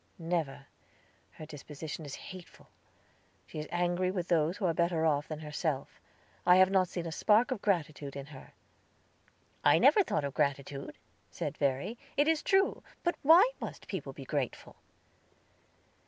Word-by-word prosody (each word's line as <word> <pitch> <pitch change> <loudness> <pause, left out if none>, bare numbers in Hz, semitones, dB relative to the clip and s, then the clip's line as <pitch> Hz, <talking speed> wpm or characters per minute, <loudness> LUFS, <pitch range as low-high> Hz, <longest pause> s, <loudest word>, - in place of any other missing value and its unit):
"Never; 160 -5 -2 0.7
her 155 - -9
disposition 150 +1 -8
is 140 - -6 0.2
hateful. 185 -2 -13 0.8
She - - -8
is 150 - -5
angry 175 +1 0
with 180 -2 -3
those 165 +2 +2
who 195 - -2
are 170 - +2
better 170 -1 +1
off 150 -2 +1
than 155 - -5
herself. 150 -2 -3 0.4
I 180 0 +6
have 185 +1 +6
not 190 -2 +3
seen 175 -1 -5
a 165 - -4
spark 215 +9 +3
of 240 -6 -2
gratitude 155 -7 -1
in 140 -1 -6
her." 135 - -13 1.1
"I - - +6
never 425 - +6
thought 155 - -1
of 140 - -4
gratitude," 140 -1 -2 0.3
said - - -4
Verry, 140 - -1 0.2
"it 290 +1 +4
is 320 -1 +2
true; 385 0 +2 0.2
but 345 - +2
why 335 - +7
must - - -7
people - - -5
be - - -10
grateful?" - - -3
165 Hz, 155 wpm, -31 LUFS, 150-185 Hz, 1.1 s, why